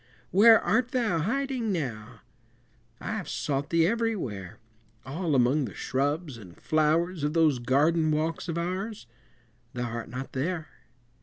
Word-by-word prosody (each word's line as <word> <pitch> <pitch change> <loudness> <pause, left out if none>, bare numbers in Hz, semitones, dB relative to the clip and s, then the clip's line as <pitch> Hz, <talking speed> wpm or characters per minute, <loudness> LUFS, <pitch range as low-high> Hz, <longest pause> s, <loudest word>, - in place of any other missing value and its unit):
Where 220 +4 +7
art 250 -1 +1
thou 225 -10 +1
hiding 250 - -1
now? 120 - -4 0.8
I - - -5
have - - -4
sought 140 0 -2
thee 165 -1 +3
everywhere, 180 - -2 0.5
All 155 +2 -1
among 130 +3 +3
the 105 - -8
shrubs 145 +1 -2
and 90 -6 -13
flowers 155 +2 +1
Of 150 +1 0
those 155 -6 +3
garden 155 +6 +2
walks 160 +3 -1
of 165 - -2
ours 185 - -3 0.7
Thou 120 -1 -3
art 115 0 -5
not 130 +2 -6
there! 155 +4 -2
155 Hz, 140 wpm, -27 LUFS, 135-185 Hz, 0.8 s, Where